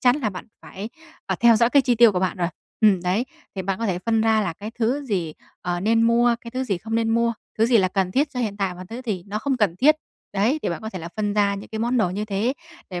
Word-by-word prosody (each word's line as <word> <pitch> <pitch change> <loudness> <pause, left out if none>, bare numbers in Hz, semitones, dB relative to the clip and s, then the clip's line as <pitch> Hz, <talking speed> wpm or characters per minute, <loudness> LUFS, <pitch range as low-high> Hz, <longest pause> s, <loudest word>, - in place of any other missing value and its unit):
chắn 250 +2 +4
là 230 -8 -1
bạn 180 - -8 0.2
phải, 200 +3 -7 0.4
à, - - -1
theo 235 -2 +6
dõi 235 +2 +3
cái 280 0 +5
chi 245 -1 +2
tiêu 230 -2 +6
của 180 - -1
bạn 185 +1 0
rồi. 175 -1 0 0.3
Ừm, 200 -5 +4
đấy, 190 +7 +1 0.3
thì 190 - -3
bạn 195 +1 -2
có 230 - -1
thể 180 -2 -1
phân 225 +3 +1
ra 220 -1 +3
là 175 -5 -1
cái 205 +6 -8
thứ 250 +6 +1
gì, 180 - -2 0.3
ờ, 175 0 -2
nên 225 +3 +3
mua, 235 +1 +4
cái 235 - -9
thứ 260 +2 -2
gì 195 -7 -1
không 220 +3 -5
nên 225 0 +1
mua, 235 0 +2 0.3
thứ 225 - +4
gì 235 -2 +4
là 185 - +3
cần 185 -1 -1
thiết 285 +2 +1
cho 250 - -4
hiện 210 -4 -2
tại 195 -3 -1
và 185 +1 -9
thứ 230 +2 -6
gì 190 -5 -2
nó 205 +1 -3
không 270 +3 -1
cần 200 -7 +1
thiết. 300 +9 +5 0.4
Đấy, 220 +10 +1
thì - - 0
bạn 170 - -3
có 220 - -5
thể 185 - -6
là 170 +1 -7
phân 210 -1 0
ra 200 -1 +2
những 200 - -8
cái 220 - -5
món 240 +3 0
đồ 210 -6 +2
như 205 +3 -3
thế, 210 +5 0 0.4
để 180 - -4
215 Hz, 295 wpm, -23 LUFS, 190-235 Hz, 0.4 s, theo